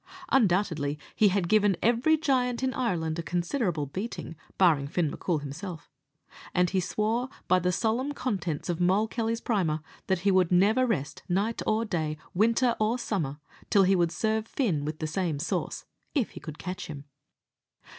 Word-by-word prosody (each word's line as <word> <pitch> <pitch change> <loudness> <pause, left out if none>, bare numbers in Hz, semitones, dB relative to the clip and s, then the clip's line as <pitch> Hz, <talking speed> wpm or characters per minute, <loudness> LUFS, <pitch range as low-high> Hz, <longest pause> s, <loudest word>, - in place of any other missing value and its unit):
Undoubtedly 175 - +2 0.2
he 215 - +5
had 190 -2 +1
given 205 -2 +3
every 245 +8 +3
giant 255 -5 +1
in 260 0 +1
Ireland 170 -10 -1
a - - 0
considerable 175 - -1
beating, 185 - -5 0.2
barring 155 -7 +4
Fin 160 -1 0
M'Coul 165 -5 -1
himself; 160 +4 -7 0.6
and 180 -1 +3
he 190 - +2
swore, 220 +7 -1 0.2
by 185 - +4
the 180 0 +1
solemn 230 +8 0
contents 195 - -3
of 175 -1 -2
Moll 190 +5 +3
Kelly's 230 0 -2
Primer, 170 -9 0 0.3
that 190 -2 +1
he 200 +1 +3
would 185 -2 +3
never 210 +8 +4
rest, 150 - -2
night 200 +6 0
or 220 +1 +2
day, 155 -6 -2 0.2
winter 230 +5 +3
or 215 +3 +2
summer, 165 - -2 0.3
till 200 -3 +5
he 190 +1 +4
would 170 -2 +2
serve 220 +5 0
Fin 180 - 0
with 155 +1 -3
the 155 - -3
same 165 -1 -1
sauce, 150 - -3 0.3
if 260 -7 +1
he - - -9
could 155 -2 -8
catch 185 0 -5
him. 145 -3 -7
190 Hz, 170 wpm, -28 LUFS, 165-225 Hz, 0.6 s, he